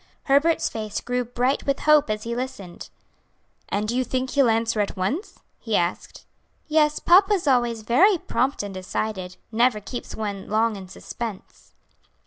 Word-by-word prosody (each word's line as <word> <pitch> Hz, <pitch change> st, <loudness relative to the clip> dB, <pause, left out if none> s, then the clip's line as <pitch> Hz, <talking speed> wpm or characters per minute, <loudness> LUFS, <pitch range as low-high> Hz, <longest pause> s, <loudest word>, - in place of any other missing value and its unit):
Herbert's 290 Hz, +4 st, +3 dB
face 215 Hz, -2 st, -4 dB
grew 250 Hz, 0 st, -2 dB
bright 245 Hz, +4 st, -1 dB
with 275 Hz, -1 st, 0 dB
hope 300 Hz, -1 st, +4 dB
as 215 Hz, 0 st, -2 dB
he 235 Hz, 0 st, -3 dB
listened. 245 Hz, -8 st, -6 dB, 0.8 s
"And 205 Hz, +1 st, -1 dB
do 235 Hz, -, -1 dB
you 255 Hz, -, +2 dB
think 255 Hz, +1 st, -2 dB
he'll 275 Hz, -4 st, +3 dB
answer 225 Hz, 0 st, +1 dB
at 205 Hz, -1 st, -1 dB
once?" 270 Hz, -, -3 dB, 0.2 s
he 225 Hz, -3 st, -2 dB
asked. 175 Hz, -1 st, -2 dB, 0.4 s
"Yes, 300 Hz, -1 st, +3 dB
papa 390 Hz, +4 st, +5 dB
is 360 Hz, -, -3 dB
always 240 Hz, -4 st, +2 dB
very 355 Hz, -, +4 dB
prompt 270 Hz, -6 st, -1 dB
and 200 Hz, -1 st, -6 dB
decided; 185 Hz, 0 st, -4 dB
never 235 Hz, 0 st, +2 dB
keeps 240 Hz, +4 st, -7 dB
one 205 Hz, -3 st, -5 dB
long 220 Hz, +1 st, +1 dB
in 190 Hz, -2 st, -9 dB
suspense." 215 Hz, +2 st, -8 dB
235 Hz, 160 wpm, -24 LUFS, 210-275 Hz, 0.8 s, papa